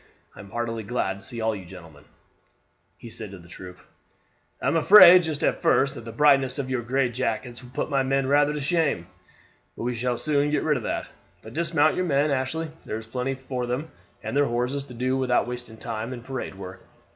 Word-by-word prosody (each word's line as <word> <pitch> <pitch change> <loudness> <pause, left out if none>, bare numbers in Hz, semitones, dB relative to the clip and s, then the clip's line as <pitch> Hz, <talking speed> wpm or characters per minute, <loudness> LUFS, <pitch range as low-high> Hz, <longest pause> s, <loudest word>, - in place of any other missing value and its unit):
I - - -14
am 100 - -11
heartily 115 +1 -3
glad 100 -3 -2
to - - -18
see 125 - -9
you 115 - -3
all, 110 -1 +1
gentlemen," 85 -6 -12 0.9
he 115 - -11
said 110 -2 -8
to 100 - -10
the 85 -1 -15
troop. 90 +1 -10 0.8
"I - - -6
am - - +2
afraid 180 +2 +9
just 155 -3 -3
at - - +1
first 135 0 +3
that 115 - -10
the 115 - -6
brightness 135 0 +3
of 130 -2 -3
your 130 -2 0
gray 130 +3 +1
jackets 120 0 -3
will 125 - -13
put 130 - -4
my 135 -1 +2
men 135 0 +1
rather 145 +2 +3
to 150 - -3
shame; 145 - 0 0.7
but - - -5
we 125 0 -1
shall 120 +1 -1
soon 145 +1 +1
get 150 - 0
rid 150 -2 +2
of - - -5
that. - - -3 0.3
But 110 - -11
dismount 160 -1 +2
your 185 - 0
men, 145 -2 +2
Ashley; 140 +4 -2
there 110 - -4
is 110 - -8
plenty 125 +4 -3
for 130 -2 -4
them 130 +6 -3 0.3
and - - -4
their 145 0 +4
horses 125 +3 -2
to 125 - -11
do 130 +2 0
without 125 -2 +1
wasting 120 -2 -7
time 115 +2 -5
in 120 -2 -8
parade 130 -6 -5
work. 95 -1 -9
125 Hz, 220 wpm, -25 LUFS, 115-140 Hz, 0.9 s, afraid